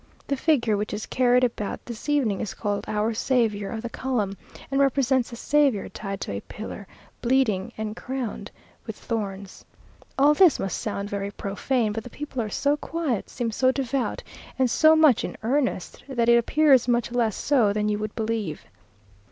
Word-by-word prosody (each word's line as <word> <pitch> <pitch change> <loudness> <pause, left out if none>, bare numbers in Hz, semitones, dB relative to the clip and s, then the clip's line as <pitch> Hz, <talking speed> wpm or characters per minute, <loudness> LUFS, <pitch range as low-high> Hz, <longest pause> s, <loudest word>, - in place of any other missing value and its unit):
The 280 - -1
figure 255 -7 +2
which 210 0 -3
is 210 - -5
carried 250 0 +3
about 225 -4 -2
this 235 +4 -7
evening 255 -10 +1
is 215 - -4
called 205 -2 -2
"Our 215 +1 0
Saviour 220 -4 0
of 225 -1 -5
the 235 - -3
Column," 220 -7 -2 0.4
and 275 0 +2
represents 265 -2 +2
the 235 - -8
Saviour 280 -4 +2
tied 195 -2 -6
to - - -4
a 100 0 -4
pillar, 210 -2 -8 0.3
bleeding, 235 -7 +1
and 215 0 -4
crowned 255 -4 -5 0.4
with - - -5
thorns. 200 -4 -5 0.5
All 285 +2 +6
this 345 -1 +5
must 195 - -3
sound 205 -1 -4
very 200 0 -2
profane, 210 +4 -1
but 225 0 -4
the 245 - -9
people 280 -1 -5
are 215 - -3
so 285 +7 +1
quiet, 305 -9 -3
seem 240 -3 -3
so 255 +4 +3
devout, 265 -1 -2 0.3
and 260 -2 +2
so 315 +4 +6
much 310 -7 +5
in - - -5
earnest, 255 -5 -1
that 235 -3 +1
it 235 - +7
appears 265 +1 +4
much 240 -1 +1
less 235 -4 +1
so 250 -8 +2
than 210 +1 0
you 210 0 0
would 215 0 -4
believe.... 220 -8 -3
235 Hz, 180 wpm, -25 LUFS, 210-265 Hz, 0.5 s, it